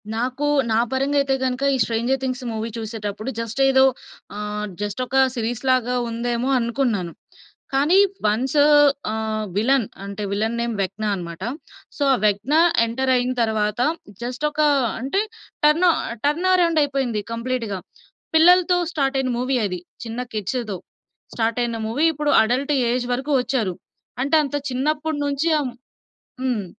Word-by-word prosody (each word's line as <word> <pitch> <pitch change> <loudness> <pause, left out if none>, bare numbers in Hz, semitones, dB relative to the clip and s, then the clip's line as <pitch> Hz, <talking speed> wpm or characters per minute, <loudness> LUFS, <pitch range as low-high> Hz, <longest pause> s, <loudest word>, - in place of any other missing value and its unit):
నాకు, 255 +5 -2 0.3
నా 220 - +3
పరంగా 275 +2 0
అయితే 275 -1 +1
గనుక 255 +1 -2
ఈ - - 0
'స్ట్రేంజర్ 235 +4 0
థింగ్స్' 255 0 -3
మూవీ 220 +1 -3
చూసేటప్పుడు 215 0 -5
జస్ట్ 230 +2 -4
ఏదో 265 0 +5 0.5
ఆహ్, 210 0 -4
జస్టొక 240 +5 -3 0.2
సీరీస్ 235 +1 -3
లాగా 250 -1 +2
ఉందేమో 235 +2 -2
అనుకున్నాను. 230 -7 -1 0.6
కానీ 290 +7 +4 0.3
వన్సు 260 +8 +2 0.5
ఆహ్, 220 0 -2
విల్లెన్ 240 +3 +2 0.2
అంటే, 200 +1 -6
విల్లెన్ 220 +3 -1
నేమ్ 235 0 -1
వెక్న 195 +3 -4
అన్నమాట. 170 -2 -7 0.6
సో, - - -9
ఆ - - +2
వెక్న 210 +7 +1 0.3
ఎంటరయిన 255 +1 +1
తరువాత, 215 -1 0 0.4
జస్ట్ 245 +4 -5
ఒకా 300 +1 +2 0.3
అంటే 275 +11 0 0.4
టర్నో 335 +4 +5 0.3
టర్న్ 315 +6 +1
అరౌండయిపోయింది 285 -10 +1
కంప్లీట్‌గా. 230 -4 -3 0.6
పిల్లలతో 360 +2 +6 0.2
స్టార్టయిన 270 -3 0
మూవీ 255 +2 0
అది. 180 -3 -3 0.3
చిన్న 230 +1 -5
కిడ్స్‌తో. 215 0 -3 0.6
స్టార్టయిన 230 +1 0
మూవీ 265 +8 +1
ఇప్పుడు 295 0 0
అడల్ట్ 260 +6 0 0.2
ఏజ్ 245 0 -1
వరకు 265 +4 -3
వచ్చారు. 225 -8 -1 0.5
అంటే, 285 +4 +2
అంత 280 - -5 0.2
చిన్నప్పడి 300 +4 -1
నుంచి 285 +3 0
అం 270 - -2 0.7
హ్మ్. 240 -6 -1
250 Hz, 130 wpm, -22 LUFS, 220-275 Hz, 0.7 s, పిల్లలతో